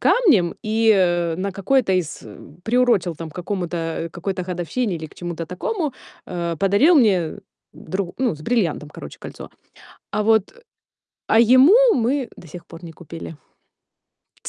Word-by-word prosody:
камнем 250 - +3
и, 220 +1 +2
э, 175 -3 +1
на 195 +2 -3
какой-то 200 +3 +1
из, 180 -4 -1
э, - - -12 0.3
приурочил 230 -8 +2
там 165 0 -7
к - - -19
какому-то, 180 -1 -4 0.3
э, - - -8
какой-то 185 +2 -4
годовщине 180 +3 -2
или 160 - -7
к - - -19
чему-то 170 -2 -6
такому, 300 - -3 0.3
э, 170 -2 -3
подарил 205 - +4
мне 190 - +3 0.4
дру 190 -2 -5
ну, 250 -7 +1
с 150 - -14
бриллиантом, 170 -9 -1
короче, - - -10
кольцо. - - -9 0.6
А 210 - 0
вот, 220 -2 +2
э 480 - -20 0.7
а 220 - +4
ему 255 - +7 0.2
мы 255 +2 0
до - - -13
сих 170 +3 -11
пор 165 0 -12
не 165 - -9
купили. 165 -1 -9 1.1
Ц - - -5
190 Hz, 160 wpm, -21 LUFS, 170-235 Hz, 1.1 s, ему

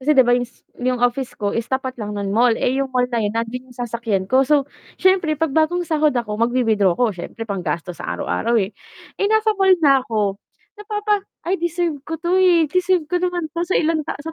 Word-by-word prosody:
kasi 295 +2 +2
'di 260 - +7
ba 245 - +3
yung 245 -1 +1
s - - -29 0.4
office 245 +1 -1
ko 205 -1 -2
is 230 0 -3
tapat 260 -2 -3
lang 210 -1 -4
nun 200 -1 -2
mall, 235 +1 +3
eh, 265 +2 0
'yung 275 - -1
mall 250 -1 +1
nandun 230 +3 -2
yung 250 - -17
sasakyan 230 -5 -2
ko 260 +7 +3
so, 280 0 +3 0.3
siyempre 370 -5 +2
'pag 320 -1 -1
bagong 320 +4 +1
sahod 305 -4 +1
ako 220 -3 -2
mag-wi-withdraw 225 -6 +2
ko 240 -4 +2
siyempre 190 +5 -7
panggastos 175 -4 -4
sa - - -5
araw-araw, 90 - 0
eh. 200 -1 0 0.5
Eh, 400 - +2
nasa 440 0 +3
mall 385 -2 +4
na 275 -2 +6
ko 205 -3 -1 0.3
napapa 420 0 -1 0.2
ay 360 0 -1
deserve 340 -3 -1
ko 320 +4 -5
'to, 350 +3 +1
eh, 350 -3 +5
deserve 360 +2 +1
ko 355 +4 -1
naman 355 -2 -1
'to 340 - -3
sa 350 +2 0
ilang 320 0 +1
ta - - -2
sa 325 - -5
265 Hz, 215 wpm, -20 LUFS, 225-340 Hz, 0.5 s, di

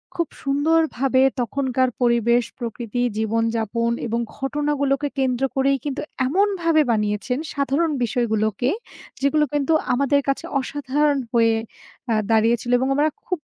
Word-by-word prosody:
খুব 340 -2 0 0.2
সুন্দরভাবে 275 -2 +2 0.2
তখনকার 260 0 0
পরিবেশ, 235 0 +3 0.2
প্রকৃতি, 235 0 -4 0.2
জীবন-যাপন 225 +1 0 0.2
এবং 230 +1 -1 0.2
ঘটনাগুলোকে 285 0 0
কেন্দ্র 260 -1 0
করেই 275 +1 +2
কিন্তু 285 -1 -3 0.3
এমনভাবে 340 -1 +2
বানিয়েছেন, 210 +3 -1 0.2
সাধারণ 280 +4 +1
বিষয়গুলোকে, 220 0 0 0.5
যেগুলো 300 +2 +3
কিন্তু 290 +2 +1 0.2
আমাদের 280 +2 +2
কাছে 275 - -1
অসাধারণ 290 +1 0
হয়ে 230 -1 +4 0.6
আ - - +3 0.2
দাঁড়িয়েছিল 225 +2 +2
এবং 260 - 0
আমরা 300 +2 +3 0.2
খুব 365 - -1
265 Hz, 115 wpm, -22 LUFS, 235-290 Hz, 0.6 s, হয়ে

